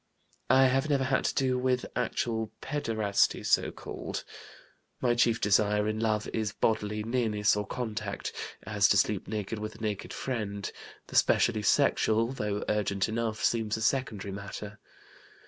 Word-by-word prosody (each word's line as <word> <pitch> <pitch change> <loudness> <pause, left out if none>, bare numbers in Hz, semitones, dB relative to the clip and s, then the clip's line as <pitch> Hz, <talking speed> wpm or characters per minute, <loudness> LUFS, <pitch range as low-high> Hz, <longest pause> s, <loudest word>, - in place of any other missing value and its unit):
"I 130 0 +6
have 135 +3 +2
never 140 -2 +2
had 130 0 +1
to - - 0
do 130 -1 +1
with 125 0 +1
actual 110 -2 -1
pederasty, 110 -8 0
so - - +3
called. - - -6 0.8
My 120 -2 +2
chief 120 -1 +3
desire 105 +1 +3
in 110 0 -1
love 110 -2 0
is 110 -2 -1
bodily 105 -1 0
nearness 110 -3 +1
or 105 0 -2
contact, 115 -4 -4 0.3
as - - +3
to - - +4
sleep - - +1
naked 105 0 -3
with 110 0 -5
a - - -14
naked 105 -3 -3
friend; 105 -6 -3 0.3
the - - -10
specially 110 -3 +4
sexual, 110 +3 +3
though 105 -5 -2
urgent 100 -2 0
enough, 115 -1 -2
seems 110 -2 +1
a - - -6
secondary 110 -6 0
matter. 100 +1 -7
110 Hz, 150 wpm, -29 LUFS, 105-120 Hz, 0.8 s, I